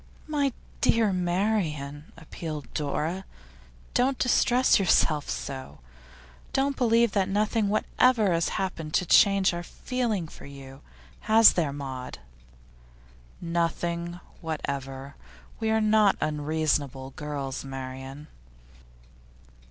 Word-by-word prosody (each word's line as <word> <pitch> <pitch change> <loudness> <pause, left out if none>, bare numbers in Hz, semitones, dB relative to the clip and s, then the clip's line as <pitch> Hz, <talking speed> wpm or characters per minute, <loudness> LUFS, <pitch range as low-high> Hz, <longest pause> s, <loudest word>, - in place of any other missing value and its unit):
'My 290 -3 0 0.3
dear 225 -4 +3
Marian,' 175 -6 -1
appealed 155 -3 -7
Dora, 155 +5 -2 0.7
'don't 260 +1 +2
distress 250 -1 +3
yourself 155 -5 +2
so! 65 +3 -5 0.8
Do 275 +1 +2
believe 235 -3 +3
that 195 -1 +1
nothing 210 +1 +1
whatever 215 0 +2
has 165 0 +1
happened 165 -5 -3
to 180 - +2
change 195 +1 +5
our 175 - -3
feeling 230 -1 -2
to - - -13
you. 135 -1 -11 0.5
Has 225 +1 +8
there, 160 -5 0
Maud?' 135 -3 -6 1.2
'Nothing 170 0 -2 0.2
whatever. 140 -3 -5 0.4
We 220 - 0
are 220 0 +3
not 215 -2 +4
unreasonable 150 -3 -1
girls, 140 -2 -5
Marian. 135 +1 -7
170 Hz, 100 wpm, -27 LUFS, 140-215 Hz, 1.2 s, Has